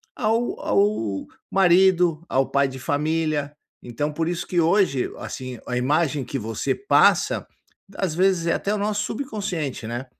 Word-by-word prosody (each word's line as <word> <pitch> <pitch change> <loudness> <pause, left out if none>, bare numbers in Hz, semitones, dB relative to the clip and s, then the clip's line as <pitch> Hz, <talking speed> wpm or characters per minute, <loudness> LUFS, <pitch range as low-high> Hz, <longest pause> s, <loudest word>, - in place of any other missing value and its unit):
ao 230 +1 0
ao 200 - 0 0.3
marido, 180 -3 +4
ao 135 0 +1
pai 140 0 +2
de 130 0 -8
família. 150 +1 -1 0.3
Então, 145 +5 -3
por 160 +2 -1
isso 175 0 -3
que 175 -2 +1
hoje, 165 -6 +2
assim, 130 -2 -7
a 125 - -2
imagem 145 +2 +1
que 130 +2 -4
você 110 -1 -2
passa, 405 - +3 0.5
às 185 -5 -1
vezes, 185 -1 +2
é 170 - +3
até 200 - -1
o - - 0
nosso 210 0 -1
subconsciente, 195 - -4
né. 120 +3 -4
160 Hz, 155 wpm, -23 LUFS, 135-195 Hz, 0.5 s, marido